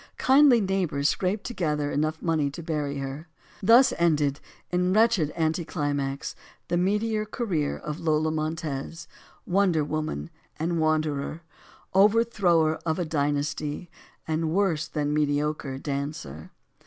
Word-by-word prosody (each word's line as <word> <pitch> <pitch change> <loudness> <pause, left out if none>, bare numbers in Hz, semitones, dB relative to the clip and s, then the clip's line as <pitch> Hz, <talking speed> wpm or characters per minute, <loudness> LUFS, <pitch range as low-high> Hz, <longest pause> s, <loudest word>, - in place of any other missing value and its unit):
Kindly 265 -3 +5
neighbors 180 -7 0
scraped 195 +3 -1
together 150 -10 -2
enough 155 +2 -1
money 160 -4 +1
to 165 +4 -8
bury 150 -3 -2
her. 135 +4 -6 0.3
Thus 245 +6 +6
ended 150 -4 +2 0.3
in 180 +1 +1
wretched 215 -8 +3
anticlimax 145 -4 -2 0.3
the 175 - +1
meteor 210 +4 +1
career 200 - -2
of 150 +2 -6
Lola 155 -1 +1
Montez; 155 -1 -4 0.4
Wonder 180 -4 +2
Woman 150 - -3 0.3
and 165 +1 -1
wanderer; 155 0 0 0.5
over 210 +4 +5
thrower 170 -8 +2
of 160 -1 -1
a 175 - -1
dynasty 150 +2 -2 0.4
and 160 0 0
worse 165 -3 +1
than 150 -1 -2
mediocre 150 -2 0
dancer. 140 - -5
155 Hz, 120 wpm, -26 LUFS, 145-180 Hz, 0.5 s, Thus